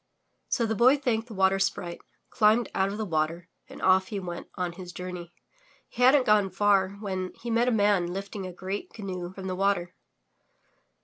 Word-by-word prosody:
So 235 - +1
the 220 - 0
Boy 250 +6 +5
thanked 235 -4 -1
the 225 - -9
Water 190 0 +3
Sprite, 175 -2 -2 0.3
climbed 220 +2 +3
out 190 +1 +1
of 200 - -5
the 220 - -2
water 165 0 -2 0.2
and - - -11
off 190 0 +4
he 205 -3 -4
went 175 -2 -6
on 180 -1 -2
his 180 0 -9
journey. 180 0 -7 0.6
He 245 - -7
hadn't 260 +1 +6
gone 210 -2 +4
far 195 0 +2
when 190 -3 -4
he 235 - -5
met 235 +2 +2
a - - +3
man 205 -5 +2
lifting 195 0 -5
a - - -7
great 190 +3 -5
canoe 185 -4 -6
from 190 0 -9
the 185 -1 -2
water. 185 -2 0
195 Hz, 190 wpm, -27 LUFS, 180-215 Hz, 0.6 s, hadn't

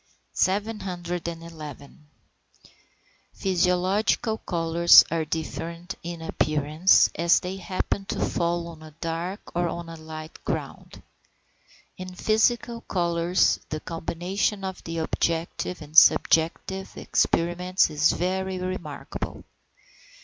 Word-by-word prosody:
711. 170 -7 -3 1.3
Physiological 190 +4 +1
colours 170 0 +6
are 165 -1 0
different 165 +3 -5
in 170 -1 -6
appearance 155 +3 +3
as 170 +1 +4
they 185 +1 -5
happen 195 +1 -3
to - - -4
fall 170 0 0
on 160 -2 -12
a 155 -1 -13
dark 170 +5 -5
or 175 0 +1
on 170 0 -5
a 165 - -7
light 155 0 -10
ground. - - -5 0.9
In 185 0 -8
physical 230 +3 +1
colours 170 -2 +1
the 155 - -3
combination 175 +5 -2
of 190 -1 -5
the 165 0 -4
objective 165 +1 -2
and 150 +1 -14
subjective 170 +4 +4
experiments 180 +1 +1
is 150 0 +3
very 190 +1 -1
remarkable. 180 -5 -5
170 Hz, 100 wpm, -25 LUFS, 165-185 Hz, 1.3 s, colours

